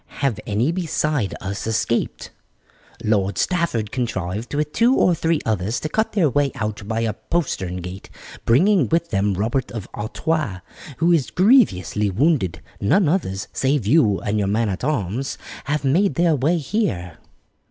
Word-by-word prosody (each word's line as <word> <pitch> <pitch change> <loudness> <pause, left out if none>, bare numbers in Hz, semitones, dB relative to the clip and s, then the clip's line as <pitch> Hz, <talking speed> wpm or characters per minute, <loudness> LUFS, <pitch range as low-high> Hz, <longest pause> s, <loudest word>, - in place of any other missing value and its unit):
Have 120 -7 0
any 110 +9 +1
beside 155 - -1
us 100 +3 -4
escaped?" 115 +1 -1 0.7
"Lord 100 -2 +1
Stafford 170 - 0
contrived, 105 -3 -3
with 150 0 -1
two 240 +4 +4
or 180 - +4
three 165 -1 +1
others, 110 +1 -1
to 155 - -3
cut 220 +7 0
their 190 -7 +3
way 140 +1 +1
out 105 -3 -4
by 110 +1 -1
a 115 -2 0
postern 100 - -2
gate, 90 +2 -8 0.3
bringing 165 - +4
with 170 +1 0
them 100 -1 +1
Robert 115 +7 -1
of 110 -5 -6
Artois, 120 - -2 0.4
who 170 +2 +3
is 145 -9 +2
grievously 110 - +3
wounded. 95 - +1 0.2
None 180 - +3
others, 105 - -1
save 135 -4 +1
you 110 -5 +4
and 105 +1 -1
your 100 - 0
man 110 +2 +1
at 95 +3 -4
arms, 130 - -2 0.3
have 150 0 -1
made 180 +9 +2
their 170 -2 +3
way 150 +6 +1
here." 130 - -2
120 Hz, 155 wpm, -21 LUFS, 100-160 Hz, 0.7 s, two